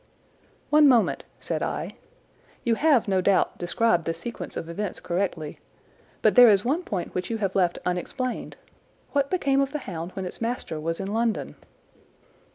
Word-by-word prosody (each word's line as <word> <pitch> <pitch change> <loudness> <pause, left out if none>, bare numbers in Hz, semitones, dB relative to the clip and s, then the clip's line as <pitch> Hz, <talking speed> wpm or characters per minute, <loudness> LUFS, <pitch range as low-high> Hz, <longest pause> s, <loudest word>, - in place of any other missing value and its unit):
"One 300 0 +7
moment!" 245 -4 +3
said - - -3
I. - - -3 0.7
"You 235 - +2
have, 265 -3 +3
no 190 -2 +2
doubt, 195 +1 +2
described 175 -1 +1
the 165 - -1
sequence 230 +8 -6
of 165 - -4
events 185 +3 -4
correctly, 175 -4 -3 0.6
but - - +5
there 245 -2 +9
is 205 +1 +4
one 295 +8 +1
point 195 - -4
which 180 - -3
you 230 - -1
have 195 -3 -1
left 180 -3 +2
unexplained. 210 +8 -3 0.5
What 280 -1 +1
became 275 -7 +2
of 275 0 -1
the - - 0
hound 170 -1 -5
when 190 - -4
its 180 - -7
master 230 -9 -3
was 165 +2 -3
in 195 +1 -3
London?" 230 0 0
205 Hz, 165 wpm, -25 LUFS, 180-250 Hz, 0.7 s, there